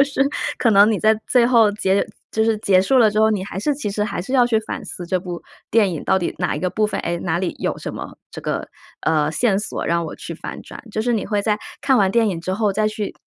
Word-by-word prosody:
就 275 - +7
是 280 -1 -5 0.4
可 235 - +3
能 205 +1 +6
你 210 - +1
在 220 0 +4
最 245 -2 +4
后 230 -4 +5
结 195 -1 +1 0.3
就 220 - +1
是 225 -1 +2
结 190 -3 +4
束 260 +7 +3
了 220 -3 +5
之 215 - +1
后， 220 0 +5
你 200 -3 -1
还 195 - -6
是 290 +5 0
其 265 -8 -4
实 210 +1 -1
还 210 - -2
是 195 +9 -6
要 255 -2 +5
去 225 -2 +2
反 220 - -6
思 175 - -8
这 185 +1 0
部 175 -1 -6 0.3
电 210 -5 +3
影 155 - -5
到 190 - +3
底 175 - -3
哪 180 - -1
一 - - -3
个 185 - 0
部 215 +2 +1
分， - - -3
诶， 170 - -2
哪 170 -1 -1
里 185 -1 -2
有 - - -2
什 - - -6
么 - - -8
这 - - -8
个， - - -3 0.4
呃， 155 -1 +2
线 205 +2 +1
索， 210 - -4
让 170 0 +1
我 - - -7
去 - - -7
反 - - -7
转。 - - -11
就 215 - -2
是 240 +2 0
你 220 - 0
会 205 -2 0
在 210 -1 +1 0.2
看 265 -2 +3
完 195 -3 +3
电 225 0 +3
影 170 -4 -3
之 185 - -3
后 205 0 +1
再 215 +2 +1
去 215 -1 -4
210 Hz, 305 characters per minute, -21 LUFS, 185-225 Hz, 0.4 s, 就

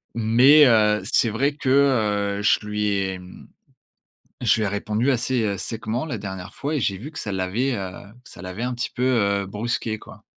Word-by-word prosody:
Mais 125 +7 +6
heu, 105 -3 +4
c'est 115 - +2
vrai 140 +7 0
que, 140 - -3 0.7
heu, - - -4
je 105 +1 +2
lui 105 0 -2
ai, 95 -2 0
hem, 90 0 -13 0.9
je - - +3
lui 110 - -2
ai 105 - 0
répondu 105 +6 -1
assez 120 -5 0
séchement 115 - -3
la 125 -8 -4
dernière 95 -2 -7
fois 145 +3 -3
et - - 0
j'ai 100 -5 -1
vu 140 +11 -9
que 160 - -8
ça 105 - -4
l'avait, 100 +8 -1
heu, 95 -3 -5 0.3
ça - - -13
l'avait 95 +4 -6
un 125 0 -2
petit 120 +2 -4
peu, 125 - -3
heu, 100 -6 +1
brusqué, 110 +2 -3
quoi. - - -14
110 Hz, 195 wpm, -23 LUFS, 100-125 Hz, 0.9 s, Mais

